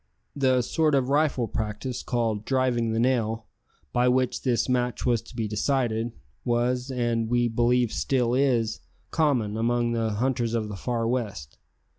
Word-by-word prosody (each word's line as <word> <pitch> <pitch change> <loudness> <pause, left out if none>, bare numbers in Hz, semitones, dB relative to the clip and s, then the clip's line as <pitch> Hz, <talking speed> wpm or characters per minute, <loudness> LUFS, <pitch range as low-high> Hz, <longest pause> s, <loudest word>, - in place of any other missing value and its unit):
The 130 -2 +2
sort 155 +3 +1
of 130 -1 +1
rifle 145 -4 +2
practice 110 +4 -4
called 115 -4 -1
"driving 125 -3 +1
the 110 - 0
nail," 115 -3 +1 0.5
by 125 +1 +3
which 125 0 +1
this 125 -3 +1
match 125 -1 0
was 120 -3 +2
to 115 - -15
be 115 -2 -1
decided, 115 +1 0 0.3
was, 125 +2 0
and 120 -3 -1
we 120 0 +2
believe 120 0 +2
still 125 -3 +1
is, 125 -4 +1 0.3
common 130 -10 +1
among 120 +1 +1
the 115 -2 0
hunters 120 0 0
of 110 -2 -1
the 105 - -5
far 115 +2 -2
west. 100 - -3
120 Hz, 155 wpm, -26 LUFS, 115-130 Hz, 0.5 s, by